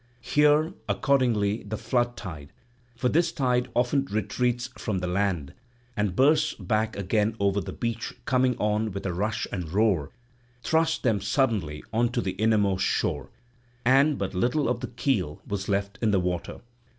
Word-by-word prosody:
Here 150 +3 +3 0.2
accordingly 110 -2 +2
the 105 +1 -5
flood 120 +2 0
tide—for 120 - -7
this 165 +5 +2
tide 125 -4 0
often 125 +3 +2
retreats 120 +3 -1
from 105 -4 -2
the 90 - -2
land 90 -5 -1 0.4
and 105 -3 -1
bursts 150 +5 +3
back 110 +3 -1
again 105 +3 0
over 100 0 +1
the - - -6
beach 115 -1 -3
coming 125 -1 +2
on 105 0 0
with 100 - -5
a 90 - -1
rush 105 +5 -1
and 90 -5 -4
roar—thrust 125 - -1
them 110 -6 +2
suddenly 100 - 0
on 120 +2 +2
to 120 - +1
the 95 - -2
innermost 100 -1 +2
shore, - - -1 0.6
and 135 +4 +4
but 100 -1 -3
little 125 +10 +1
of 120 0 0
the 125 - -4
keel 115 - -1
was 100 -1 -4
left 100 +1 -1
in 110 - +2
the 100 -2 +3
water. 90 -1 -3
110 Hz, 155 wpm, -26 LUFS, 100-125 Hz, 0.6 s, and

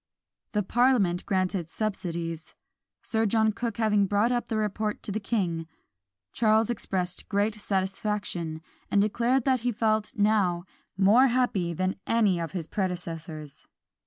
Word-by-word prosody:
The 210 -1 +1
parliament 215 -5 +2
granted 185 -3 0
subsidies. 170 -5 -4 0.5
Sir 225 -2 +1
John 220 +1 +3
Cooke 230 0 -4
having 210 -3 +3
brought 205 +5 +2
up 245 -1 -1
the 225 - -1
report 210 0 -2
to - - -4
the 215 - -1
king, 180 -7 -1 0.7
Charles 220 0 +3
expressed 180 -6 -3
great 205 +1 +1
satisfaction, 195 -5 -2 0.3
and 200 - +3
declared 235 +5 +2
that 260 -2 +3
he 245 +1 0
felt 215 -1 0
now 205 -5 +2 0.3
more 210 +7 +6
happy 235 -9 +1
than 185 +2 -1
any 210 -6 +3
of 165 +1 -4
his 175 -4 -3
predecessors. 165 -5 -4
205 Hz, 135 wpm, -27 LUFS, 180-220 Hz, 0.7 s, more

